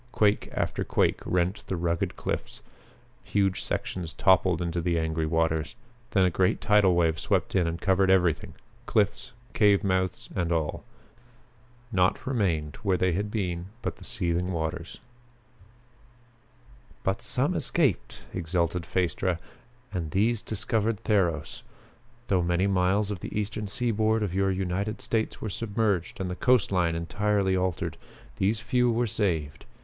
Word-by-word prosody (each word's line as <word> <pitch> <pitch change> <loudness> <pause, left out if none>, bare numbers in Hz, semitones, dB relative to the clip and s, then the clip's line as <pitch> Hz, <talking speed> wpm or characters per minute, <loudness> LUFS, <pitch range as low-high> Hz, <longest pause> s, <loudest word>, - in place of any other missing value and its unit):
Quake 105 -3 +2
after - - -1
quake - - +1
rent 90 +3 0
the 95 - -1
rugged 85 -1 -1
cliffs: - - -4 0.6
huge 95 -2 +1
sections 85 -3 -3
toppled 95 -2 +3
into 85 -1 -2
the 85 0 0
angry 80 -1 -1
waters. 80 +1 0 0.3
Then 95 -2 +3
a 90 - +2
great 90 +2 +2
tidal 105 -4 +4
wave 80 -2 +2
swept - - 0
in 90 -3 +3
and 85 +1 -3
covered 95 -1 +2
everything, 90 -4 +2 0.3
cliffs, 105 -2 +1 0.2
cave 105 -1 +4
mouths 95 -2 0
and 85 -2 0
all. 80 -3 -1 1.1
Nought 95 -3 +2
remained 90 - 0
where 100 -5 +1
they 95 0 +2
had 100 +4 -1
been 90 -5 -2 0.2
but - - -3
the - - -13
seething 90 -5 -1
waters. 85 0 -3 2.1
"But 95 0 0
some - - 0
escaped!" - - 0
exulted 85 0 -1
Phaestra, 90 0 0 0.6
"and 85 -5 -2
these 110 +6 +2
discovered 110 0 -1
Theros. 85 -9 0 0.7
Though 95 -2 +2
many 90 +2 +1
miles 100 +2 +2
of 100 - -4
the 105 - -4
eastern 105 0 -3
seaboard 110 0 +1
of 95 -4 -2
your 95 +1 +2
United 95 +3 -2
States 110 -1 -1
were 110 - -3
submerged 105 -4 -1
and 95 - -2
the 90 - -3
coastline 95 -9 +2
entirely 100 +3 0
altered, 90 -2 -1 0.4
these 105 +3 +1
few 125 +2 +2
were 120 +1 +1
saved. 85 -10 -1
95 Hz, 140 wpm, -27 LUFS, 85-105 Hz, 2.1 s, tidal